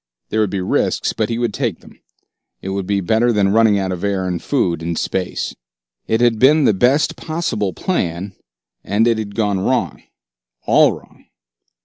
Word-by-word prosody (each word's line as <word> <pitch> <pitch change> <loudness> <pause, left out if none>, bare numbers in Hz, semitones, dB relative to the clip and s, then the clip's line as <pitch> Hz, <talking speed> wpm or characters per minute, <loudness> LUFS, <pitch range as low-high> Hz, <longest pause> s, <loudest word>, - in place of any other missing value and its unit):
There 110 - -1
would 105 -2 +2
be 95 -1 -3
risks, 90 - 0
but 110 -1 -1
he 115 - -2
would 120 -3 -1
take 115 -7 -2
them. - - -18 0.6
It 95 - -6
would 95 -1 -3
be 100 -1 0
better 110 +6 +2
than 100 -3 +2
running 110 -1 +4
out 95 -1 -1
of 90 0 -5
air 100 -2 -1
and 90 -2 -3
food 90 - 0
in 85 0 -3
space. 90 +2 -3 0.5
It 110 +1 +1
had 120 -2 +3
been 150 +5 +5
the - - +4
best 125 +9 +2
possible 155 - -2
plan, 95 - -3 0.5
and 105 +4 +1
it 115 -2 +2
had 100 -2 -6
gone 105 -4 0
wrong, 95 - -1 0.6
all - - +5
wrong. - - -15
105 Hz, 180 wpm, -18 LUFS, 95-115 Hz, 0.6 s, been